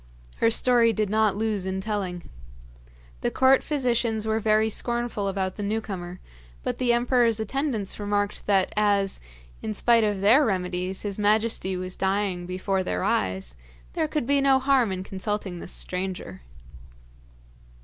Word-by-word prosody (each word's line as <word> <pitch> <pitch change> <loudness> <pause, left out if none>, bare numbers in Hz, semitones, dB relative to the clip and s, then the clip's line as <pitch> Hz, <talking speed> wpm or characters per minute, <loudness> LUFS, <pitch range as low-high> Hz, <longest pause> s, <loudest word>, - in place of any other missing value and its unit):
Her 230 - +3
story 235 0 +4
did 210 -1 -1
not 215 -2 +2
lose 210 -3 -1
in 190 0 -2
telling. 190 -4 -3 0.9
The - - 0
court 265 0 +4
physicians 235 -6 0
were 220 0 +1
very 215 0 +3
scornful 235 -2 -2
about 190 -1 -2
the - - -4
new 210 +2 -1
comer, 180 -4 -7 0.4
but - - -3
the 250 -1 +2
emperor's 240 -2 +2
attendants 220 -3 -2
remarked 205 0 -2
that 195 -2 +2
as, 200 -2 +1 0.4
in 105 - -4
spite 235 -2 +4
of 205 -2 0
their 225 +9 +5
remedies, 185 -3 -2
his 205 -1 -4
majesty 210 -2 +1
was 185 0 -5
dying 190 -2 -1
before 190 +1 -1
their 90 - -2
eyes, 95 -8 -1 0.4
there 155 - 0
could 300 - -2
be 280 +2 +2
no 275 -1 +5
harm 265 -5 +2
in 185 0 -3
consulting 195 -1 -4
this - - -8
stranger. 180 - -4
205 Hz, 150 wpm, -25 LUFS, 190-230 Hz, 0.9 s, their